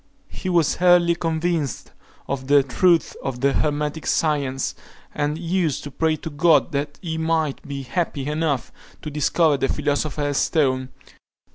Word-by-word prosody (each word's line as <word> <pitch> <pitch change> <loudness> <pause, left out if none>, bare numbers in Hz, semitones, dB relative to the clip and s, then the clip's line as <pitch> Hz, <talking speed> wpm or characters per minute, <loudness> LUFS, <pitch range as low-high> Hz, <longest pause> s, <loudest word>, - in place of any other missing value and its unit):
He 185 - -5
was 170 -2 +1
early 175 -1 +5
convinced 165 -3 -2 0.4
of 130 -1 -4
the 145 0 +5
truth 170 +6 +2
of 125 -3 -4
the 140 0 +3
hermetic 150 +1 -1
science, 140 -4 0 0.4
and 150 +1 -1
used 170 -2 -1
to 145 - -7
pray 160 +2 +1
to 160 - -7
God 155 0 +3
that 145 0 -3
he 160 -2 -3
might 160 -3 0
be 140 -1 -5
happy 145 -1 -2
enough 150 -3 -1 0.3
to 150 - -5
discover 150 +1 +2
the 135 - 0
philosopher's 145 0 -1
stone. 130 -5 +1
150 Hz, 145 wpm, -22 LUFS, 140-165 Hz, 0.4 s, early